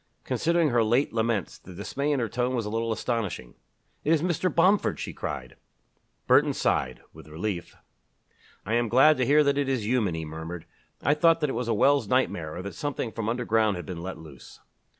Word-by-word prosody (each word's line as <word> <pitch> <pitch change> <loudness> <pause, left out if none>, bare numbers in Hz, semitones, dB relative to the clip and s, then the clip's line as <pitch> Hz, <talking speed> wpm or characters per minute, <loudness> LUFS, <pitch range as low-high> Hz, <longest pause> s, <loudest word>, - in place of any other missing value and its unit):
Considering 170 -1 +1
her 120 -2 +3
late 120 +6 +1
laments, 115 -4 -1
the 90 - -13
dismay 140 +9 -2
in 145 - +1
her 115 - 0
tone 125 +4 -1
was 115 -3 -2
a 105 - -4
little 115 +1 -1
astonishing. 105 - -3 0.5
"It 155 - +1
is 160 -1 +3
Mr. 180 +1 0
Bomford!" 190 +4 +2
she - - -5
cried. 65 -4 -6 0.7
Burton - - +4
sighed - - -1
with 80 0 -14
relief. 85 +3 -5 0.9
"I 105 - -2
am 120 -1 +1
glad 135 +7 +6
to 125 -2 0
hear 150 +2 +5
that 140 0 +1
it 140 -1 0
is 130 -6 -1
human," 110 -7 +1
he 80 -1 -4
murmured. 80 +2 -7 0.4
"I 145 - +4
thought 165 +2 +4
that 150 -3 +1
it - - -4
was 120 0 -3
a 115 - +1
Wells 135 +1 +3
nightmare 85 -11 0
or 90 - -5
that 100 -1 -6
something 135 - -3
from 110 -1 -3
underground 115 -3 +1
had 90 -2 -6
been 85 -1 -6
let 95 +2 -6
loose." 75 -5 -13
115 Hz, 205 wpm, -26 LUFS, 95-140 Hz, 0.9 s, glad